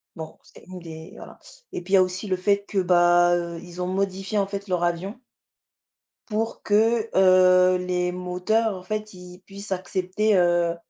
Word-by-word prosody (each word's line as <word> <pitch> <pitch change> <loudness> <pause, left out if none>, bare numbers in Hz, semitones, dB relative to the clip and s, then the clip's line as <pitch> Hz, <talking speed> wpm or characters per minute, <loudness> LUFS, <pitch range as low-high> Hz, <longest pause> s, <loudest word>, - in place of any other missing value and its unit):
Bon, 160 -2 -9
c'est - - -18
une 185 0 -9
des 160 -1 -11
voilà - - -12 0.4
et - - -4
puis 185 +3 -7
il - - +8
y - - +7
a 185 - +6
aussi 185 +3 -5
le 185 -1 -1
fait 200 +2 0
que 205 - -5
bah, 175 -1 +4
heu, 170 -1 -4
ils 175 0 -9
ont 180 - -2
modifié 195 +2 -2
en 195 - 0
fait 200 0 -6
leurs 180 -2 -1
avions 180 +7 -3 1.1
pour 225 +1 -3
que, 225 +2 +1
heu, 185 -1 +5
les 180 -1 -2
moteurs 180 +5 -1
en 185 - -10
fait, 215 +2 -5
ils 180 0 -13
puissent 200 0 -10
accepter, 190 +3 -1
heu 175 -1 +2
185 Hz, 185 wpm, -23 LUFS, 180-200 Hz, 1.1 s, il